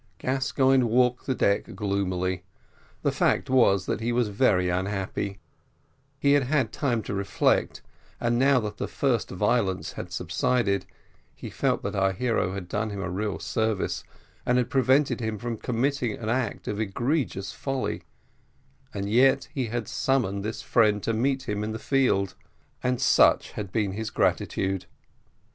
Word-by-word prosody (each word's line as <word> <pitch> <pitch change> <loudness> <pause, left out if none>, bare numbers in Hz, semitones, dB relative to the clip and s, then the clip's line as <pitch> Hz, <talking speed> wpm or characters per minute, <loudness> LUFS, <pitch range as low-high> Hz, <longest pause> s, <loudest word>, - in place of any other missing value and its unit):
Gascoigne 130 0 +2
walked 125 +2 +2
the 130 - +1
deck 100 -4 0
gloomily; 95 -3 -1 0.6
the - - +2
fact - - +1
was 100 -8 +4
that - - -2
he 115 +2 -1
was 120 -2 +1
very 100 -4 +2
unhappy; 95 +2 -2 0.8
he 140 0 +3
had 145 - +5
had 130 -4 +1
time 120 -6 0
to - - -5
reflect, 100 0 +1 0.4
and 120 0 +1
now 135 0 +5
that 105 -1 -5
the - - -3
first 125 -6 0
violence 95 0 0
had - - -7
subsided, 105 -7 0 0.5
he - - -8
felt - - 0
that - - -3
our 95 0 +2
hero 110 -3 0
had 95 -2 -6
done 105 +4 -2
him 100 -1 -5
a 95 -2 -3
real 105 +2 -2
service, 110 -3 -1 0.4
and 125 - +2
had 125 -2 0
prevented 135 +2 +3
him 110 -2 -2
from 120 +1 -4
committing 125 0 -1
an 110 0 -5
act 120 -2 -1
of 105 - -2
egregious 120 0 -1
folly; 135 -2 -3 0.9
and 100 0 -2
yet 130 +5 +3
he 130 -5 -1
had 115 0 -3
summoned 110 -8 0
this 110 +2 -4
friend 105 -4 +3
to 115 - 0
meet 130 +3 0
him 105 -1 -2
in 110 +1 -3
the - - -3
field 120 -7 +1 0.5
and 125 -1 0
such - - +4
had 100 -3 -6
been 105 -2 0
his 110 +3 -4
gratitude. 95 -3 0
110 Hz, 160 wpm, -26 LUFS, 100-125 Hz, 0.9 s, had